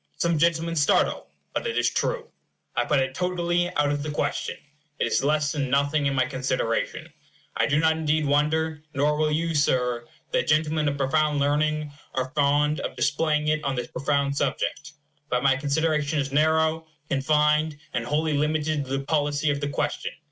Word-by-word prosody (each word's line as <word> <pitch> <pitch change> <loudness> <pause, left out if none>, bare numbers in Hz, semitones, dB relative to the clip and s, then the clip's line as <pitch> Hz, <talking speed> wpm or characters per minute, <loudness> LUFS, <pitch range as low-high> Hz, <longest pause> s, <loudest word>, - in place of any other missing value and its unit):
Some 170 -2 +1
gentlemen 165 0 +1
startle 145 -2 +2 0.3
but - - -2
it 460 - -2
is - - +3
true; - - -1 0.5
I - - +1
put 150 - +2
it 130 0 0
totally 175 +1 0
out 145 -1 +2
of 145 0 -1
the 155 - -4
question. 145 -1 -2 0.4
It - - +1
is - - +1
less 150 +1 +1
than 140 -4 -2
nothing 140 +2 +2
in 135 - 0
my 130 -1 +3
consideration. 125 -3 -2 0.4
I - - +2
do 145 +1 +2
not 160 0 +3
indeed 155 -1 0
wonder, 150 +2 +1
nor 145 +2 +2
will 155 0 +1
you, 165 +2 0
Sir, 125 -5 +1 0.2
that - - 0
gentlemen 155 0 +2
of 140 0 -1
profound 150 +2 +1
learning 150 +1 +1 0.2
are 130 0 -1
fond 145 +1 +2
of - - -4
displaying 150 0 +1
it 155 0 0
on 140 -1 -1
this 125 -1 -4
profound 140 0 0
subject. 145 +1 -2 0.4
But 125 +1 0
my 135 -1 +4
consideration 150 +2 0
is 140 -1 -1
narrow, 160 +2 +2 0.2
confined, 150 +2 +2 0.2
and 120 - -1
wholly 150 +3 0
limited 150 0 0
to 135 +1 -2
the 135 - -5
policy 145 0 +1
of 145 0 -2
the 145 - -1
question. - - -2
150 Hz, 180 wpm, -25 LUFS, 140-155 Hz, 0.5 s, my